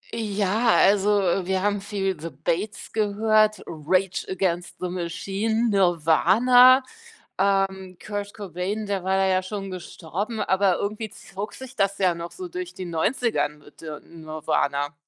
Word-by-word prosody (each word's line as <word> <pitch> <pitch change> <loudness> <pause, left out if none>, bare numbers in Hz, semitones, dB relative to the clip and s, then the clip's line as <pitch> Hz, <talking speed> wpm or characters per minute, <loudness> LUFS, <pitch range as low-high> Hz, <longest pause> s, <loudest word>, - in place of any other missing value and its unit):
Ja, 215 +1 +1
also 200 +1 +4 0.4
wir 190 0 0
haben 205 -1 0
viel 195 -4 -2
The 165 +2 -5
Bates 170 +8 -3
gehört, 215 0 +2
Rage 180 +4 -1
Against 180 -2 -1
the 180 - -2
Machine, 195 +6 -1
Nirvana, 200 - +5 0.5
ähm, 190 -1 0
Kurt 205 -1 -5
Cobain, 200 +2 -4
der 195 -3 -2
war 190 +1 +1
da 195 - +3
ja 185 0 +2
schon 195 0 -5
gestorben, 185 +4 -5
aber 190 -1 +2
irgendwie 215 +1 -3
zog 200 +2 -8
sich 260 0 -10
das 195 0 +1
ja 185 -3 +2
noch 170 0 -7
so 370 -1 -7
durch 360 0 -6
die 185 - -7
90er 220 - 0
mit, 150 +1 -18
äh, 155 -2 -7
Nirvana. 155 -3 -2
195 Hz, 145 wpm, -24 LUFS, 175-210 Hz, 0.5 s, Nirvana